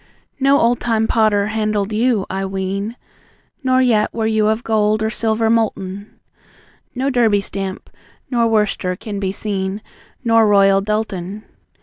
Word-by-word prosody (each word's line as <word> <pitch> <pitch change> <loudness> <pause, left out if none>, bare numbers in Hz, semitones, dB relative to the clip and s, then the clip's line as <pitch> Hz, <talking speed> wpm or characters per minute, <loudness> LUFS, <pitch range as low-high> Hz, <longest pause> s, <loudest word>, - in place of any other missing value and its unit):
No 275 +1 +4
old 235 +1 +2
time 225 -2 0
potter 215 -3 +2
handled 215 -1 -1
you, 225 -2 +1
I 195 - -3
ween, 195 +3 -3 0.7
Nor 260 0 +3
yet 220 -4 +2
were 225 -1 -2
you 220 -1 +2
of 220 +2 0
gold 215 -1 +1
or 220 - 0
silver 220 0 0
molten; 205 -3 -2 0.8
No 265 +3 0
Derby 225 -5 +3
stamp, 195 -1 -6 0.4
nor 235 -2 +2
Worcester, 210 -4 0
can 205 +1 -6
be 190 -1 -1
seen, 195 -1 -3 0.4
Nor 225 -2 +4
Royal 195 -1 +4
Doulton. 210 -1 -3
215 Hz, 140 wpm, -18 LUFS, 200-225 Hz, 0.8 s, No